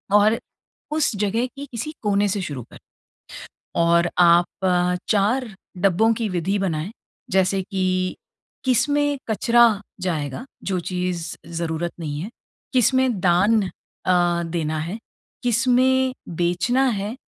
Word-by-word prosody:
और 215 +2 +5 0.6
उस 305 -6 +1
जगह 210 +4 0
की 280 +2 -9
किसी 240 +6 -4
कोने 205 -1 +2
से 200 +1 -1
शुरू 145 -8 -5
कर। - - -13 1.0
और 170 +1 +4
आप 175 0 +6 0.2
अ, 180 -1 +2
4 220 +3 +1 0.2
डब्बों 195 +4 +3
की 225 0 -2
विधि 180 +2 0
बनाएँ। 175 -1 -2 0.4
जैसे 190 0 +2
कि 185 -1 -1 0.5
किसमें 285 +3 +2
कचरा 235 +3 +4 0.4
जाएगा 160 - -3 0.2
जो 185 -2 0
चीज़ 180 -1 -3
ज़रूरत 170 0 -3
नहीं 150 -3 -4
है, 195 - -5 0.4
किसमें 260 -2 +3
दान 190 +5 +4 0.4
अ, 175 -1 +2
देना 160 -2 -2
है, 170 +7 -4 0.5
किसमें 255 +2 +3 0.2
बेचना 180 +10 +1
है 210 0 -3
195 Hz, 120 wpm, -22 LUFS, 175-235 Hz, 1.0 s, आप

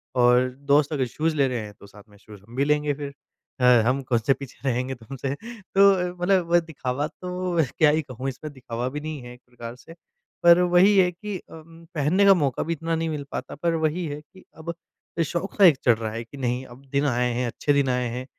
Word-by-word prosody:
और 125 +1 +4 0.2
दोस्त 145 +1 +4
अगर 135 -3 0
शूज़ 155 +6 -1
ले 140 -2 +3
रहे 125 -2 -2
हैं 105 -1 -8
तो 100 - -14
साथ 105 +1 -15
में 105 - -19
शूज़ 105 -1 -14
हम 115 +4 -15
भी 140 - +1
लेंगे 150 0 +1
फिर। 140 0 -7 0.5
अ, - - -2 0.2
हम 130 +3 +1
कौन-से 120 +1 +2
पीछे 135 -2 -10
रहेंगे 130 +2 -2
तुमसे? 130 +3 -5
तो 195 -4 +1
मतलब 175 -2 +2
दिखावा 145 -2 -3
तो 180 0 -4 0.2
क्या 155 - +5
ही 155 +2 +2
कहूँ 130 -1 -5
इसमें? 150 +4 -8
,दिखावा 125 -2 -5
भी 150 +3 -5
नहीं 155 -2 -6
है 120 0 -10
एक 125 - -17
प्रकार 120 -1 -9
से। 165 +6 -14 0.5
पर 170 0 +8
वही 180 +3 +5
है 180 -2 +5
कि 200 +2 -6
अम 165 +1 -13
पहनने 160 +7 +3
का 195 - +8
मौक़ा 145 -8 0
भी 165 - -2
इतना 165 +1 -2
नहीं 165 0 -1
मिल 150 -2 -3
पाता - - -5
पर 170 +3 0
वही 165 +3 0
है 145 0 -5
कि 170 +5 -19
अब 165 +1 -5 0.5
शौक़ 170 +6 -4
सा 205 - +4
एक 160 -7 +7
चल 120 - +7
रहा 110 -1 -4
है 115 +1 -5
कि 140 +5 -13
नहीं 125 0 -2
अब 125 +1 -14
दिन 140 +1 +1
आए 125 -1 +1
हैं, 125 +1 -1
अच्छे 145 +5 0
दिन 140 -2 +2
आए 125 -1 0
हैं। 125 +2 -5
145 Hz, 230 wpm, -24 LUFS, 125-165 Hz, 0.5 s, पर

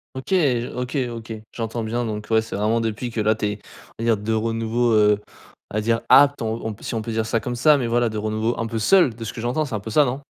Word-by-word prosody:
OK, 130 - -7
j 130 -10 +2
OK, 125 +3 -3
OK, 115 -1 -7 0.2
j'entends 115 0 -3
bien 120 +2 -2
donc 105 -1 -5
ouais, 110 - +4
c'est 110 - -7
vraiment 110 +3 +1
depuis 115 +2 -3
que 115 - -4
là 110 +1 +2
tu 105 - -3
es, 105 0 -2 0.4
on - - -3
va - - -1
dire 115 -3 +3
de 110 +2 -2
renouveau, 115 +2 0
heu, 105 -1 +4 0.5
à 110 - -2
dire 115 +1 +1
apte 145 -1 +6
on 110 0 -3
on 110 - -2
p 105 - -16
si - - -4
on 110 - -1
peut 115 +1 -5
dire 110 0 -1
ça, 115 +1 0
comme 120 +3 -4
ça 150 +4 +5
mais 120 -3 -1
voilà 120 0 +2
de 110 - -5
renouveau 110 +2 -1
un 115 - -1
peu 115 0 -3
seul 175 - +4
de 115 0 -9
ce 110 - -5
que 115 - -7
j'entends 125 +6 0
c'est 130 - -4
un 105 - -2
peu 110 +2 -7
ça, 145 +6 +5
non? 130 +3 -3
115 Hz, 290 wpm, -22 LUFS, 110-120 Hz, 0.5 s, apte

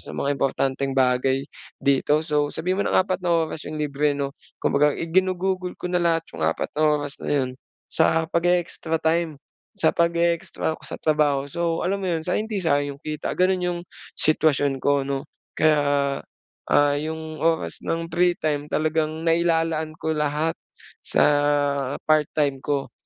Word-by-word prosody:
sa - - -9
mga 140 - 0
importanteng 135 0 -1
bagay 130 +1 +2 0.3
dito, 145 +3 +2
so 150 -2 +1
sabihin 185 +6 -2
mo - - 0
ng - - +2
4 185 -1 -2
na 175 -1 +2
oras 160 - -6
'yong 155 - -5
libre 145 -1 0
'no, 140 -1 -2 0.3
kumbaga 145 +1 +3
ginugugol 185 +1 0
ko 180 - -5
na 180 - +2
lahat 165 -1 +2
'yong - - -8
4 80 +1 -1
na 150 - -3
oras 145 -1 -1
na - - -5
'yon 130 -3 +1 0.3
sa 160 0 +2
pag-e-extra 170 -1 0
time, 160 -1 0 0.4
sa 160 - +3
pag-e-extra 170 -1 0
ko - - -15
sa - - -7
trabaho. 145 -3 +2
So, 165 +3 -1
alam 195 +1 -1
mo 185 - -1
'yon, 160 -2 -2
so 180 - 0
hindi 215 -1 -2
sayang 145 -5 0
'yong - - -42
kita 155 -1 -3
gano'n, 185 0 +2
'yong 175 -1 -1 0.4
sitwasyon 145 -3 +2
ko 140 -1 +2
'no. 135 -1 -2 0.3
Kaya, 145 -3 +2 0.5
ah, 145 0 +3
'yong 160 +1 -5
oras 165 0 0
ng 165 0 -2
free 175 0 +3
time 145 -2 0
talagang 155 +1 -1
nailalaan 165 -1 +1
ko 160 - 0
lahat 150 +1 0 0.5
sa - - +2 0.9
part-time 150 -2 +2
ko. 140 0 -2
155 Hz, 160 wpm, -24 LUFS, 145-170 Hz, 0.9 s, kumbaga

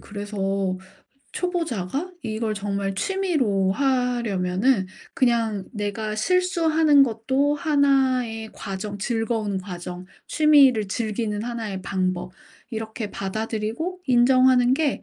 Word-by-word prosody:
그래서 205 0 -7 1.0
초보자가 330 - -2
이걸 220 0 -2
정말 200 -1 -2
취미로 255 - 0
하려면은 240 -5 +1 0.3
그냥 230 -6 +1
내가 215 0 -3
실수하는 320 - +3
것도 265 +4 +1
하나의 265 -7 +1
과정 200 +1 -5
즐거운 220 -2 -1
과정 180 -1 -7 0.2
취미를 275 -9 +5
즐기는 215 0 -2
하나의 225 -5 -4
방법 185 -1 -2 0.4
이렇게 220 -1 -5
받아들이고 220 - -3
인정하는 255 0 +5
게 290 0 0
225 Hz, 250 characters per minute, -24 LUFS, 205-270 Hz, 1.0 s, 취미를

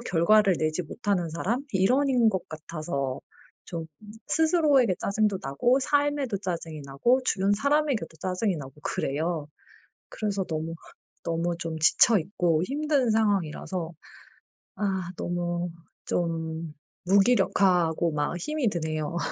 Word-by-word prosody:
결과를 195 -1 +3
내지 155 +3 0
못하는 180 -1 -2
사람 230 - -2
일원인 245 +4 +3
것 190 -4 -2
같아서 155 -4 -4 0.4
좀 165 -2 -6 0.4
스스로에게 305 - +3
짜증도 205 -1 +1
나고 190 - +1
삶에도 285 -4 +1
짜증이 170 -5 -5
나고 235 - +2
주변 200 -3 +2
사람에게도 280 - +1
짜증이 185 0 -1
나고 135 -2 -8
그래요. 155 +2 -2 0.6
그래서 200 -3 -2
너무 160 -1 -4 0.5
너무 170 +1 -1
좀 165 -1 -4
지쳐 205 +7 +5
있고 170 -2 0
힘든 285 -1 +1
상황이라서 185 -5 0 0.8
아 190 -3 -2
너무 175 0 -2 0.3
좀 165 -2 -2 0.3
무기력하고 185 -5 +3
막 150 +3 -1
힘이 300 - -1
드네요. 160 -2 -3
180 Hz, 265 characters per minute, -27 LUFS, 165-225 Hz, 0.8 s, 지쳐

